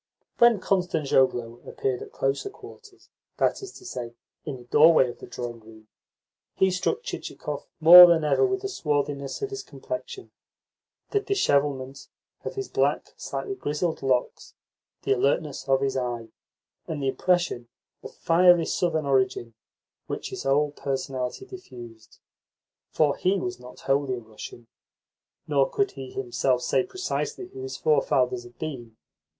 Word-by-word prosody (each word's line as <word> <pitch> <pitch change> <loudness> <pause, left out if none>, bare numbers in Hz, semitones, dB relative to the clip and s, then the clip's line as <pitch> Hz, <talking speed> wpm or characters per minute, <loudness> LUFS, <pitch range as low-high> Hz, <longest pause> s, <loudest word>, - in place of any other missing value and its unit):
When 235 -3 +6
Kostanzhoglo 135 -11 +1
appeared 130 -2 -2
at - - -9
closer 135 - -1
quarters 415 -1 -15 0.3
that - - +1
is 395 -1 -8
to 375 - -14
say, 120 - -6 0.3
in 145 -4 -5
the 125 - -13
doorway 150 +2 +5
of - - -16
the - - -10
drawing 120 -1 -6
room 110 -1 -17 0.7
he 190 0 +3
struck 185 - -1
Chichikov - - -6
more 175 +2 +11
than 170 -2 +3
ever 150 - +2
with 390 0 0
the - - -1
swarthiness 145 - -2
of 410 - -3
his 405 0 -5
complexion, 455 0 -7 0.8
the 410 - +2
dishevelment 140 - 0 0.4
of - - -5
his 400 -1 -4
black, - - 0
slightly 400 - -5
grizzled 160 - -2
locks, 130 -2 -1 0.5
the 135 - -1
alertness 140 +2 0
of 135 0 +3
his 135 -1 0
eye, 120 -3 -3 0.6
and 150 -3 -4
the - - 0
impression 175 -7 0 0.3
of - - -9
fiery 175 0 +4
southern 160 -4 0
origin 130 -3 0 0.5
which - - -5
his - - -5
whole 145 +2 +2
personality 135 - -4
diffused. 120 - -12 0.7
For 150 -2 +2
he 190 +2 +1
was 120 -6 -4
not 125 0 -13
wholly 135 -1 0
a - - -6
Russian, 110 +1 -11 0.8
nor 140 -2 +2
could 200 - 0
he 135 -2 -8
himself 125 0 -1
say - - +2
precisely 370 - -4
who 390 0 -10
his 395 0 -6
forefathers 460 -5 +1
had 365 -1 -15
been. 120 -8 -7
145 Hz, 145 wpm, -26 LUFS, 130-190 Hz, 0.8 s, more